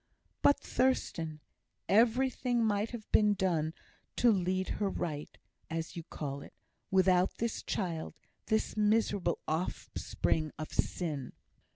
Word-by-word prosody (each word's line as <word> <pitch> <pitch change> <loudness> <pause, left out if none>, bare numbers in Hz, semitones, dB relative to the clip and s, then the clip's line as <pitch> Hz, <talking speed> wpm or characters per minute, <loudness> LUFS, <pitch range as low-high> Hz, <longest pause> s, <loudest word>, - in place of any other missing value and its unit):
"But, 285 - +5
Thurstan, 165 -11 0 0.5
everything 240 +2 +3
might 210 0 +1
have 235 -3 -7
been 210 -1 +5
done 165 -4 0 0.4
to 240 - +5
'lead 185 -1 0
her 200 - +2
right' 150 -6 -4 0.3
(as 165 0 -3
you 170 - -4
call 140 -3 -5
it), - - -13 0.3
without 185 -1 +3
this 230 -1 -2
child, 170 -5 -3 0.3
this 220 0 +1
miserable 210 -4 +2
offspring 155 -1 -1
of 155 -1 -6
sin." 150 -7 -2
185 Hz, 115 wpm, -32 LUFS, 160-220 Hz, 0.5 s, But